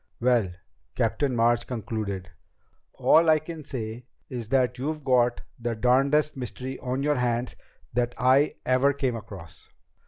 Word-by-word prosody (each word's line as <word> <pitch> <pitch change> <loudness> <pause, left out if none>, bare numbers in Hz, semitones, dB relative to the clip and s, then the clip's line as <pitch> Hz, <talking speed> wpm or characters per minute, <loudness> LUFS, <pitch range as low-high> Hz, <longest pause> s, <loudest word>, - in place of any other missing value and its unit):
"Well," 120 -5 +2 0.5
Captain 140 -4 0
March 120 0 +2
concluded, 105 -5 -4 0.6
"all 165 +1 +4
I 155 - +6
can 155 +1 -7
say 120 -3 -6 0.2
is 120 -4 -6
that 125 -2 +1
you've 150 +3 -3
got 125 -2 +2 0.2
the 120 -1 -2
darnedest 135 +6 +2
mystery 130 +1 -6
on 130 +2 -2
your 150 -1 +2
hands 120 0 -1 0.4
that 120 0 0
I 130 +4 +3
ever 130 +2 +3
came 130 -3 -1
across." 95 -7 -10
125 Hz, 135 wpm, -26 LUFS, 120-135 Hz, 0.6 s, I